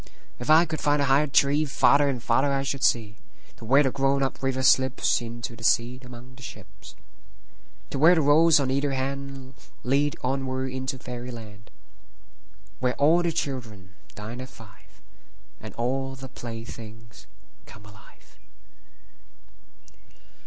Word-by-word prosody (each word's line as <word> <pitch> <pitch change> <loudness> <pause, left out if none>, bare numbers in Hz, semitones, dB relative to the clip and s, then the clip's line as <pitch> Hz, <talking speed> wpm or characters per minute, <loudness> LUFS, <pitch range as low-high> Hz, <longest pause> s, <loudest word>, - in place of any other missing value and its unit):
If 120 - -6
I 160 +2 +7
could 155 -1 -4
find 145 0 +2
a 140 - +2
higher 140 +2 +3
treeFarther 140 0 +3
and 125 -4 -4
farther 135 +4 +2
I 135 0 0
should 140 0 -3
see, 110 -5 +1 0.4
To - - -11
where 135 +5 +5
the 135 - +1
grown 135 +1 +1
up 135 - -3
river 135 -1 -1
slipsInto 120 -2 +1
the 115 - -13
sea 120 +2 +1
among 125 0 -12
the 130 - -16
ships. - - -12 1.0
To 140 - -3
where 165 +5 +7
the 160 - +2
roads 155 +2 +5
on 135 -2 -1
either 140 +1 0
handLead 135 +1 -3
onward 130 0 -2
into 130 0 -4
fairy 125 0 -7
land, 110 -3 -11 1.1
Where 125 0 0
all 160 +5 +4
the 170 -1 0
children 115 - -5 0.2
dine 110 +4 -7
at 130 - -8
five, 100 -5 -18 0.6
And - - -10
all 135 +3 -2
the 130 0 -10
playthings 115 -2 -10 0.4
come 105 0 -14
alive. 105 +1 -19
130 Hz, 140 wpm, -25 LUFS, 120-140 Hz, 1.1 s, I